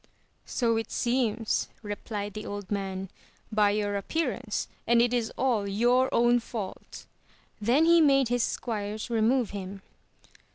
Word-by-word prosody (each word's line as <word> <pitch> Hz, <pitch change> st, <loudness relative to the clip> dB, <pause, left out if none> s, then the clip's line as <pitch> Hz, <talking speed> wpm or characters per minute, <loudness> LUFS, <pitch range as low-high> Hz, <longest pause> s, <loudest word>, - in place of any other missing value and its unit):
So 230 Hz, -3 st, +1 dB
it 225 Hz, -, -3 dB
seems, 235 Hz, -3 st, 0 dB
replied 205 Hz, 0 st, -5 dB
the 215 Hz, -, -6 dB
old 205 Hz, -1 st, -6 dB
man, 195 Hz, -2 st, -3 dB, 0.4 s
by 210 Hz, -1 st, +4 dB
your 205 Hz, 0 st, 0 dB
appearance, 250 Hz, -1 st, -2 dB, 0.2 s
and 235 Hz, +1 st, +5 dB
it 240 Hz, +1 st, +3 dB
is 235 Hz, -2 st, 0 dB
all 235 Hz, -6 st, +1 dB
your 245 Hz, +6 st, +2 dB
own 240 Hz, +1 st, +4 dB
fault! 220 Hz, -4 st, -7 dB, 0.5 s
and 210 Hz, -, -7 dB
then 280 Hz, +7 st, +5 dB
he 335 Hz, 0 st, +6 dB
made 275 Hz, -4 st, +4 dB
his 245 Hz, 0 st, +1 dB
squires 215 Hz, -1 st, -3 dB
remove 230 Hz, +1 st, +2 dB
him. 195 Hz, -1 st, -7 dB
225 Hz, 140 wpm, -28 LUFS, 205-245 Hz, 0.5 s, he